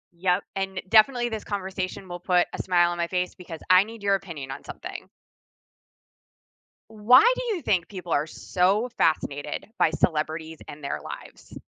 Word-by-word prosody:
Yep, 180 Hz, +1 st, +1 dB
and 195 Hz, -1 st, -3 dB
definitely 240 Hz, +3 st, +4 dB
this 220 Hz, -3 st, -5 dB
conversation 190 Hz, -1 st, -4 dB
will 175 Hz, 0 st, -6 dB
put 180 Hz, 0 st, +2 dB
a -, -, -4 dB
smile 175 Hz, -2 st, +3 dB
on 175 Hz, -, -4 dB
my 170 Hz, -, 0 dB
face 180 Hz, +1 st, -2 dB
because 170 Hz, -3 st, -9 dB
I 185 Hz, +1 st, +7 dB
need 225 Hz, 0 st, -11 dB
your 200 Hz, -1 st, +3 dB
opinion 165 Hz, -9 st, -8 dB
on 135 Hz, -, -7 dB
something. -, -, -8 dB, 1.8 s
Why 220 Hz, -, +6 dB
do -, -, -2 dB
you 350 Hz, -, -5 dB
think 185 Hz, -5 st, +1 dB
people 180 Hz, -4 st, -9 dB
are 150 Hz, -1 st, +1 dB
so 190 Hz, +8 st, 0 dB
fascinated 145 Hz, -1 st, -1 dB
by -, -, +4 dB
celebrities 160 Hz, 0 st, -1 dB
and 150 Hz, -, -10 dB
their 140 Hz, -, -3 dB
lives? -, -, -10 dB
185 Hz, 165 wpm, -25 LUFS, 165-205 Hz, 1.8 s, I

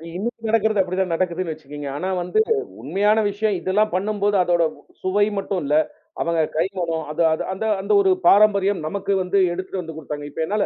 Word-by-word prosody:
இன்னும் 225 Hz, +3 st, -4 dB
நடக்குறது 220 Hz, -2 st, +2 dB
அப்படி 185 Hz, 0 st, -3 dB
தான் 180 Hz, -3 st, 0 dB
நடக்குதுன்னு 175 Hz, -2 st, -1 dB
வச்சுக்கோங்க. 145 Hz, -1 st, -9 dB
ஆனா 185 Hz, -, -3 dB
வந்து 180 Hz, -, 0 dB, 0.4 s
உண்மையான 205 Hz, +8 st, +2 dB
விஷயம் 205 Hz, -1 st, 0 dB
இதெல்லாம் 210 Hz, +2 st, +1 dB
பண்ணும்போது 205 Hz, +1 st, 0 dB
அதோட 175 Hz, -1 st, +2 dB, 0.4 s
சுவை 205 Hz, +2 st, +2 dB
மட்டும் 195 Hz, -2 st, -2 dB
இல்ல, 145 Hz, +2 st, +1 dB, 0.5 s
அவங்க 170 Hz, -1 st, +1 dB, 0.2 s
கை 165 Hz, -, +3 dB
மணம். 165 Hz, -2 st, -2 dB
அது 155 Hz, -, -2 dB
அது -, -, -2 dB
அந்த 220 Hz, +4 st, -4 dB, 0.2 s
அந்த 205 Hz, +2 st, 0 dB
ஒரு 190 Hz, -1 st, +3 dB, 0.2 s
பாரம்பரியம். 200 Hz, -3 st, +4 dB
நமக்கு 200 Hz, +3 st, -2 dB
வந்து 190 Hz, +2 st, 0 dB, 0.2 s
எடுத்துட்டு 185 Hz, +1 st, -4 dB
வந்து 160 Hz, -2 st, -8 dB
கொடுத்தாங்க. 145 Hz, -1 st, -6 dB
இப்ப 160 Hz, -, -5 dB
என்னால 205 Hz, +3 st, 0 dB
185 Hz, 180 wpm, -22 LUFS, 170-205 Hz, 0.5 s, பாரம்பரியம்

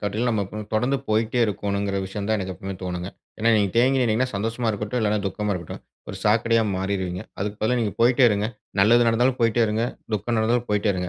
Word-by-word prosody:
காட்டிலும் 105 Hz, +4 st, -1 dB
நம்ம 110 Hz, -3 st, 0 dB
போ -, -, -8 dB, 0.2 s
தொடர்ந்து 125 Hz, +6 st, +2 dB
போயிட்டே 110 Hz, +2 st, +1 dB
இருக்கணுங்கிற 100 Hz, -1 st, -2 dB
விஷயம் 100 Hz, +1 st, -5 dB
தான் 110 Hz, -, +2 dB
எனக்கு 95 Hz, -1 st, -4 dB
எப்பவுமே 95 Hz, +3 st, -6 dB
தோணுங்க. 90 Hz, 0 st, -4 dB, 0.3 s
ஏன்னா, 115 Hz, +1 st, +2 dB
நீங்க 100 Hz, -2 st, +2 dB
தேங்கி 130 Hz, +3 st, +4 dB
நின்னீங்கன்னா, 125 Hz, +1 st, +1 dB
சந்தோஷமா 115 Hz, +3 st, -1 dB
இருக்கட்டும், 105 Hz, +3 st, -3 dB
இல்லன்னா 105 Hz, -1 st, +1 dB
துக்கமா 105 Hz, +2 st, -2 dB
இருக்கட்டும். 85 Hz, -3 st, -7 dB, 0.3 s
ஒரு 95 Hz, -, -6 dB
சாக்கடையா 115 Hz, +1 st, +3 dB
மாறிருவீங்க. 95 Hz, -1 st, -2 dB, 0.2 s
அதுக்கு 105 Hz, +2 st, -3 dB
பதிலா 125 Hz, +3 st, +2 dB
நீங்க 105 Hz, -3 st, -1 dB
போயிட்டே 125 Hz, +2 st, +5 dB
இருங்க, 105 Hz, 0 st, 0 dB, 0.3 s
நல்லது 120 Hz, +4 st, +5 dB
நடந்தாலும் 125 Hz, +3 st, +2 dB
போயிட்டே 115 Hz, 0 st, +3 dB
இருங்க, 110 Hz, +2 st, 0 dB, 0.3 s
துக்கம் 110 Hz, +3 st, -1 dB
நடந்தாலும் 120 Hz, +2 st, +1 dB
போயிட்டே 105 Hz, 0 st, +2 dB
இருங்க. 90 Hz, -1 st, -3 dB
105 Hz, 195 wpm, -24 LUFS, 100-115 Hz, 0.3 s, போயிட்டே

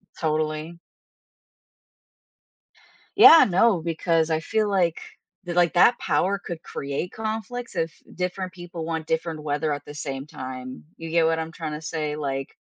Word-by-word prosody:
Totally. 155 Hz, +1 st, -2 dB, 2.4 s
Yeah, 325 Hz, -, +10 dB
no, 190 Hz, -1 st, +3 dB
because 165 Hz, 0 st, +1 dB
I 160 Hz, 0 st, +1 dB
feel 215 Hz, +5 st, 0 dB
like, 175 Hz, -4 st, +1 dB, 0.5 s
like, 175 Hz, -1 st, +2 dB
that 235 Hz, +7 st, +5 dB
power 195 Hz, +2 st, +1 dB
could 170 Hz, -2 st, -6 dB
create 140 Hz, +5 st, -4 dB
conflicts 225 Hz, +2 st, -5 dB
if 165 Hz, -2 st, -1 dB, 0.2 s
different 185 Hz, +1 st, -3 dB
people 175 Hz, -2 st, -7 dB
want 160 Hz, -1 st, -3 dB
different 160 Hz, -1 st, -2 dB
weather 150 Hz, +1 st, -1 dB
at 145 Hz, 0 st, -6 dB
the 145 Hz, -, -9 dB
same 140 Hz, -1 st, -5 dB
time. 130 Hz, -2 st, -7 dB
You 165 Hz, 0 st, -7 dB
get 165 Hz, 0 st, +3 dB
what 165 Hz, 0 st, +2 dB
I'm 160 Hz, 0 st, -4 dB
trying 160 Hz, -3 st, -5 dB
to 150 Hz, -, -6 dB
say? 155 Hz, -2 st, -3 dB
Like, 135 Hz, -2 st, -3 dB
165 Hz, 145 wpm, -24 LUFS, 155-180 Hz, 2.4 s, Yeah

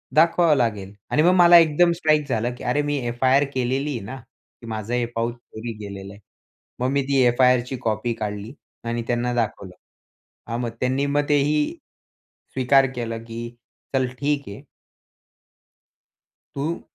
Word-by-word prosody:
दाखवावं 165 Hz, 0 st, +4 dB
लागेल. 105 Hz, -6 st, -1 dB, 0.2 s
आणि 150 Hz, -, +3 dB
मग 180 Hz, +2 st, +5 dB
मला 175 Hz, -1 st, +8 dB
एकदम 170 Hz, +1 st, +4 dB
स्ट्राईक 155 Hz, -3 st, +2 dB
झालं 120 Hz, 0 st, -1 dB
की -, -, -11 dB
अरे 125 Hz, +4 st, +1 dB
मी 145 Hz, -1 st, -1 dB
F-I-R 130 Hz, +4 st, +3 dB
केलेली 130 Hz, +3 st, -1 dB
आहे 125 Hz, -, -3 dB
ना, 130 Hz, +6 st, -7 dB, 0.4 s
की 115 Hz, -, -11 dB
माझं 110 Hz, +1 st, -4 dB
हे 125 Hz, -1 st, +1 dB
पाऊच 115 Hz, +1 st, -1 dB
चोरी 120 Hz, -1 st, -8 dB
गेलेलं 100 Hz, -1 st, -8 dB
आहे. 100 Hz, -, -15 dB, 0.6 s
मग 125 Hz, +1 st, 0 dB
मी 140 Hz, 0 st, +2 dB
ती 140 Hz, -1 st, +3 dB
F-I-Rची 125 Hz, +1 st, +2 dB
कॉपी 110 Hz, +1 st, -1 dB
काढली 105 Hz, +1 st, -5 dB, 0.3 s
आणि 120 Hz, 0 st, -3 dB
त्यांना 120 Hz, 0 st, 0 dB
दाखवलं. 100 Hz, -5 st, -3 dB, 0.9 s
मग 120 Hz, -, -2 dB
त्यांनी 130 Hz, +2 st, 0 dB
मग 145 Hz, +1 st, +1 dB
तेही 150 Hz, +1 st, +3 dB, 0.9 s
स्वीकार 135 Hz, +1 st, +4 dB
केला, 115 Hz, -2 st, -3 dB
की 115 Hz, +1 st, -7 dB, 0.4 s
चल 130 Hz, -1 st, +2 dB
ठीक 145 Hz, 0 st, 0 dB
आहे. 100 Hz, -, -10 dB, 1.9 s
तू 155 Hz, +5 st, -3 dB
125 Hz, 150 wpm, -23 LUFS, 115-145 Hz, 1.9 s, मला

